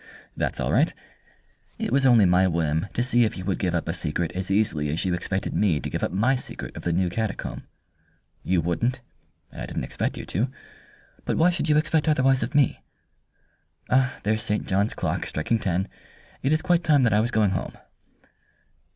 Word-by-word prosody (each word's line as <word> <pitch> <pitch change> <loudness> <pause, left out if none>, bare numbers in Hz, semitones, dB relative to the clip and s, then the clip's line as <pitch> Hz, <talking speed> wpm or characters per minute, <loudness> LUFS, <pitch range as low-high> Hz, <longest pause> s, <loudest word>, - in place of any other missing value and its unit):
"That's - - -2
all - - -1
right. - - +3 0.9
It - - -3
was 135 +1 +3
only 115 -5 +6
my 90 +1 +4
whim 80 0 0
to 120 - +1
see 120 -1 +3
if 110 - -1
you 90 - -6
would 95 -2 -1
give 90 -2 0
up 85 - -2
a 85 - -1
secret 80 0 -2
as 95 +1 -4
easily 95 -8 +1
as 80 +6 -2
you 90 - +1
expected 95 +2 -2
me 90 -8 +2
to - - -5
give - - -3
up - - 0
my 110 +9 +2
secret 125 - -7
of - - -6
the 85 - -1
new 90 +2 +1
catacomb. 110 +3 -4 0.7
You 90 -2 +1
wouldn't, 115 +10 -1 0.5
and - - -9
I - - -4
didn't - - -4
expect - - -3
you - - -6
to. 110 +9 0 0.8
But - - -1
why 175 +3 +4
should 170 -3 -2
you 150 - +4
expect 155 0 +1
otherwise 135 -3 +3
of 125 +6 -3
me? 145 -4 +3 1.4
There's 110 +1 0
St. 105 -1 -1
John's 100 +3 0
clock - - -2
striking 110 +9 -1
ten. 95 0 -1 0.5
It 135 - 0
is 155 +1 +2
quite 175 -1 +2
time 150 -4 +4
that 115 -4 +3
I 105 - +4
was 115 +2 +1
going 105 -5 +2
home." 95 - -4
105 Hz, 200 wpm, -25 LUFS, 90-130 Hz, 1.4 s, only